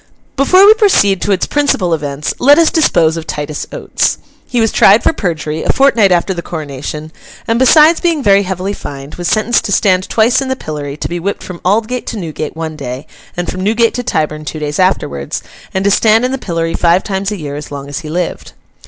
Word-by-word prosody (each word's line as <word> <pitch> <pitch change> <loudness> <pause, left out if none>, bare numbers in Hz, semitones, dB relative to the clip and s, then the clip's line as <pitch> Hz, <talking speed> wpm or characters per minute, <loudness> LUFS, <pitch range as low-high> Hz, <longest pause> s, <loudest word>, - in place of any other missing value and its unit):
Before 370 +8 +5
we 420 - +9
proceed 375 - +2
to 205 - -1
its 190 - +1
principal 270 -12 0
events, 145 -2 -3
let 285 +3 +6
us 335 -1 +4
dispose 170 - +2
of 165 0 -7
Titus 150 0 -4
Oates. - - -1 0.3
He 245 - -1
was 225 -1 +2
tried 210 +4 +5
for - - +2
perjury, 160 - -3
a - - +1
fortnight 235 -8 +3
after 180 +2 +1
the 170 - -5
coronation, 150 -1 -6 0.4
and 230 +1 +1
besides 305 +5 +5
being 330 -5 0
very 200 -2 +4
heavily 190 +1 -3
fined, 140 -5 -8
was 175 -1 -4
sentenced 220 +4 +1
to - - -3
stand 185 -2 +2
twice 230 +4 +2
in 270 - -3
the 260 - -1
pillory, 145 - -6
to - - -4
be 175 - -4
whipped 200 +4 -4
from 180 -2 -9
Aldgate 225 +6 0
to 230 - -4
Newgate 160 -5 -5
one 160 -1 -5
day, 135 -1 -6 0.3
and 175 - -2
from 185 - -4
Newgate 225 +4 +2
to 245 - -3
Tyburn 155 -9 -2
two 155 - -6
days 150 +1 -4
afterwards, 70 - -1 0.3
and 190 +1 -2
to 200 - +3
stand 225 +3 +3
in 255 - -1
the 270 - -3
pillory 165 -4 -3
five 175 +2 +2
times 195 0 -3
a 210 - -3
year 145 -4 -6
as 150 0 -7
long 140 -1 -7
as 145 +1 -5
he 155 -2 -8
lived. 175 +2 -4
185 Hz, 220 wpm, -14 LUFS, 155-230 Hz, 0.4 s, we